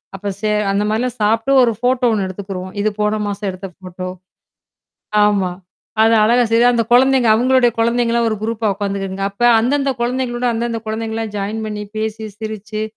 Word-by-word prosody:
அப்ப 200 +1 -4
சே 215 -1 0 0.2
அந்த 200 +1 +1
மாதிரிலாம் 230 +2 -2
சாப்பிட்டு 225 +5 +1
ஒரு 235 - +3
போட்டோ 250 0 +2
ஒண்ணு 205 -3 0
எடுத்துக்கிருவோம். 185 -1 -6
இது 215 - +2
போன 210 +1 +1
மாசம் 205 0 -3
எடுத்த 190 +1 -6
போட்டோ. 185 0 -7 1.2
ஆமா. 195 -3 +1 0.5
அதை 225 +1 +5
அழகா 240 +3 +4
செ 230 - +4
அந்த 235 -1 +1
குழந்தைங்க, 260 0 +4
அவங்களோட 255 +1 +3
குழந்தைங்கலாம் 235 0 +1
ஒரு 215 - -1
குரூப்பா 225 -1 -1
உக்காந்துக்குங்க. 195 -1 -3
அப்ப 200 - -16 0.2
அந்தந்த 275 +4 +1
குழந்தைகளோட, 245 0 -1
அந்தந்த 230 0 -2
குழந்தைங்க 220 0 -3
எல்லாம் 225 -2 -4
ஜாயின் 210 +3 -3
பண்ணி 210 -1 -5
பேசி, 220 0 -3
சிரிச்சு. 215 0 -5
220 Hz, 160 wpm, -18 LUFS, 205-240 Hz, 1.2 s, அதை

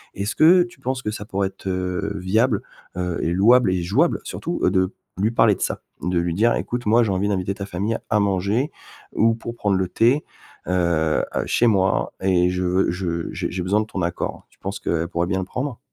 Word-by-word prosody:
Est-ce 100 +3 -3
que 175 +3 +6
tu 175 -6 -12
penses 130 0 -2
que 105 - -3
ça 105 - -6
pourrait 100 -1 -1
être, 95 - -11
heu, 90 +2 -2
viable, 105 +4 +1 0.4
heu, 90 -2 -2
et 85 - 0
louable 110 +4 +5
et 90 -1 0
jouable 125 - +2
surtout, 170 - -4
heu, - - +5
de 95 +1 +1 0.2
lui 105 +4 +1
parler 115 -3 +4
de - - -12
ça? - - -1 0.2
De 90 0 +1
lui 85 0 -1
dire: 115 +7 +3
«Écoute, 120 0 -3
moi, 115 +3 +4
j'ai 105 - 0
envie 95 +2 0
d'inviter 95 -1 -1
ta 100 0 -6
famille 100 +4 -2
à 105 - +3
manger 100 +7 +1 0.5
ou 115 +1 +4
pour 115 +1 -7
prendre 100 -4 +1
le 95 -1 0
thé, 120 +10 +2 0.4
heu 85 -3 +1
heu, - - 0
chez 120 - +2
moi 95 -4 +2
et 90 -2 +3
je 90 0 -2
veux 90 +1 +2
je 85 -2 -3
j'ai - - -3
j'ai 90 - -3
besoin 100 +4 +2
de - - -3
ton 100 -4 -5
accord». 85 0 -3
Tu - - -28
penses 100 +1 -5
qu'elle 85 0 -1
pourrait 85 -1 -1
bien 95 0 0
le 95 - -3
prendre? 125 +4 -4
100 Hz, 225 wpm, -22 LUFS, 90-115 Hz, 0.5 s, que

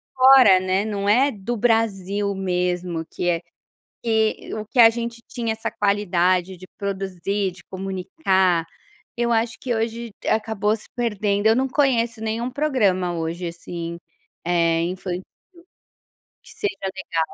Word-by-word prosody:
fora, 255 -7 +7
né, 185 +1 0
não 200 -2 -2
é 260 +7 +4
do 215 +2 -4
Brasil 205 -3 +1
mesmo 180 -3 -1
que 175 - -1
é 170 -1 0 0.6
que 220 -1 0
o 215 0 -5
que 245 +4 -3
a 225 -1 +10
gente 235 0 -5
tinha 230 -3 -2
essa 220 - -4
qualidade 185 -3 +1
de 185 - -12
produzir, 195 0 -2
de 180 - -16
comunicar, 190 - 0 0.5
eu 240 0 +1
acho 225 0 +1
que 245 -2 -1
hoje 230 +1 -3 0.2
acabou 215 -1 +1
se 215 - -13
perdendo, 210 -3 0
eu 220 - +5
não 265 +2 +1
conheço 240 -5 +1
nenhum 225 +2 -2
programa 210 -11 +1
hoje 170 +2 -3
assim, 170 0 -6 0.5
eh, 170 -1 +2
infantil, 180 +1 -4 1.2
que - - -15
seja 195 -1 -3
legal. 190 -3 -3
200 Hz, 140 wpm, -22 LUFS, 185-230 Hz, 1.2 s, a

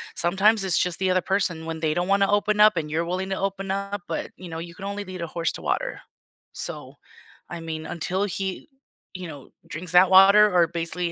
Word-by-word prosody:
sometimes 195 +4 +2
it's 185 -4 0
just 180 0 0
the 190 -1 +1
other 185 0 +2
person 180 -5 -1
when 165 -1 -5
they 155 -1 0
don't 175 +3 -1
wanna 200 0 +3
open 210 +1 +1
up 215 -1 +7
and 150 -2 -3
you're 165 +2 0
willing 185 +2 -3
to 190 - -1
open 195 0 -3
up, 200 -1 -3
but, 165 - -4
you 185 - -9
know, 160 0 -5
you 170 0 -8
can 195 - -8
only 200 +1 -4
lead 185 -2 -7
a - - -4
horse 165 0 -2
to - - -8
water. - - -2 0.5
So, - - -7 0.5
I 175 - -6
mean, 160 -1 -5
until 185 +3 -2
he, 195 - -4 0.5
you 180 -1 -6
know, 145 -4 -11 0.2
drinks 175 +3 -7
that 180 +1 +7
water 200 +2 +7
or, 170 -1 +5
basically, 170 +1 -3
185 Hz, 220 wpm, -24 LUFS, 170-195 Hz, 0.5 s, up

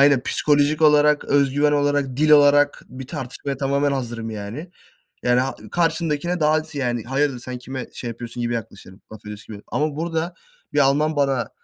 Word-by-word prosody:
aynen 140 -2 +5
psikolojik 150 +1 +1
olarak, 150 -1 +5
özgüven 145 +1 +2
olarak, 145 -3 0
dil 155 +2 +2
olarak 145 -1 +5
bir 130 0 -9
tartışmaya 140 -2 -5
tamamen 140 +1 0
hazırım, 120 -4 -4
yani. 110 - -7 0.5
Ya 125 0 +3
ra 130 +2 0 0.2
karşındakine 165 0 0
daha 150 0 +3
aksi, 155 -1 -3
yani, 120 -4 -1
hayırdır 135 0 0
sen 125 0 -7
kime 130 +1 -6
şey 120 - -6
yapıyorsun 120 +1 -8
gibi 120 0 -1
yaklaşırım, 100 -3 -8
laf 110 - -10
ediyorsun 105 +1 -9
gibi. 100 - -15
Ama 150 0 -1
burada 165 +1 -2 0.4
bir - - 0
Alman 145 +3 +3
bana 135 -4 +1
140 Hz, 170 wpm, -22 LUFS, 125-150 Hz, 0.5 s, aynen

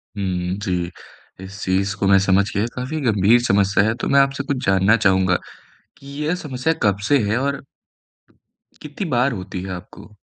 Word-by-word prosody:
हुँ, 90 -2 -2
जी, 90 -2 -2 0.5
इस 100 +2 -10
चीज़ 95 +1 0
को 100 - 0
मैं 100 0 +6
समझ 95 +1 +3
गया, 100 +3 +1
काफ़ी 130 +5 -4
गंभीर 110 -1 +3
समस्या 100 -3 +2
है। 110 - +1
तो - - -1
मैं 140 - +5
आपसे 140 0 +1
कुछ 140 -2 -3
जानना 95 +3 +4
चाहूँगा 95 -4 +2 0.6
कि 140 - -17 0.2
यह 160 +4 0
समस्या 130 +2 -1
कब 100 -2 +2
से 145 - +4
है 110 - +1
और 140 +1 -2 1.2
कितनी 150 +6 -6
बार 125 +1 +2
होती 95 -2 -6
है 95 0 -6
आपको? 90 +4 -11
100 Hz, 175 wpm, -20 LUFS, 95-130 Hz, 1.2 s, मैं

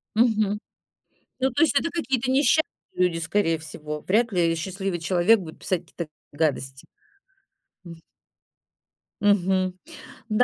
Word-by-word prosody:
Мгм. 215 -3 +2 0.8
Ну 265 +1 +2
то 290 - +1
есть 290 -3 +4
это 335 - -2
какие-то 265 -7 -1
несча 285 +4 +4 0.3
люди, 180 -2 +1
скорее 165 0 +1
всего. 150 -1 -7
Вряд 225 +6 +1
ли 170 -2 +2
счастливый 190 +2 -3
человек 180 +6 +4
будет 160 -4 -9
писать 185 -3 0
какие-то 170 -1 -7 0.2
гадости. 135 -3 -2 1.0
М. 170 - -9 1.3
Мгм, 190 -2 +2 0.6
да. 215 +3 +4
185 Hz, 120 wpm, -25 LUFS, 165-225 Hz, 1.3 s, есть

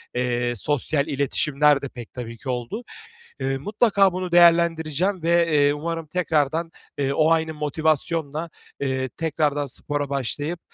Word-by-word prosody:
eee, 120 -1 0
sosyal 145 +4 0
iletişimler 140 +1 +2
de 140 - -5
pek 120 -2 -11
tabii 115 -2 -7
ki 130 - -8
oldu. 125 - -3 0.6
Eee, 135 0 -1
mutlaka 200 - +2
bunu 185 -1 -4
değerlendireceğim 170 +1 +3
ve, 170 +1 +3
eee, 145 -1 +4
umarım 165 +2 -4
tekrardan, 160 -1 0 0.3
eee, 140 -1 0
o 155 +2 +3
aynı 160 -1 +1
motivasyonla, 155 +1 -1 0.3
eee, 130 -1 -1
tekrardan 150 -1 -1
spora 145 +2 -3
başlayıp, 145 +5 -3
150 Hz, 135 wpm, -23 LUFS, 135-165 Hz, 0.6 s, eee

